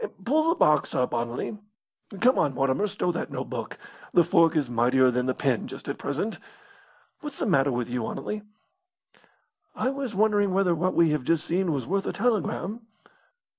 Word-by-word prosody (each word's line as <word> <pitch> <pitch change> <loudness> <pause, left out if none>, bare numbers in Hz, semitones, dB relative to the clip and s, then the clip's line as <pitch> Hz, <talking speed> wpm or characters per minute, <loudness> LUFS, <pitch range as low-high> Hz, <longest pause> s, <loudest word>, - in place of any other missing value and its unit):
Pull 310 +5 +2
the 335 - +3
box 150 - +2
up, 125 - 0
Anerley. 120 - -3 0.6
Come 255 +2 +4
on, 140 -3 +1
Mortimer, 135 +10 +1
stow 195 -3 -1
that 175 - -4
notebook! - - -5 0.4
The 175 - +7
fork 165 0 +3
is 150 -4 +1
mightier 125 +2 +3
than 125 +1 -1
the 130 - 0
pen 130 -6 0
just - - -10
at - - -4
present. 160 +10 -3 0.8
What's 295 -3 -7
the - - -1
matter 140 -8 +3
with 120 -1 -2
you, 120 -2 -3
Anerley?" 210 - -4 1.3
"I 260 - 0
was 275 -6 -4
wondering 205 -2 +2
whether 190 -3 +3
what 175 +3 -1
we 165 -2 +4
have 150 -3 -1
just 165 +4 +1
seen 180 +1 0
was 135 -5 -2
worth 195 +2 -1
a - - -2
telegram." 220 -1 -1
170 Hz, 175 wpm, -26 LUFS, 130-210 Hz, 1.3 s, The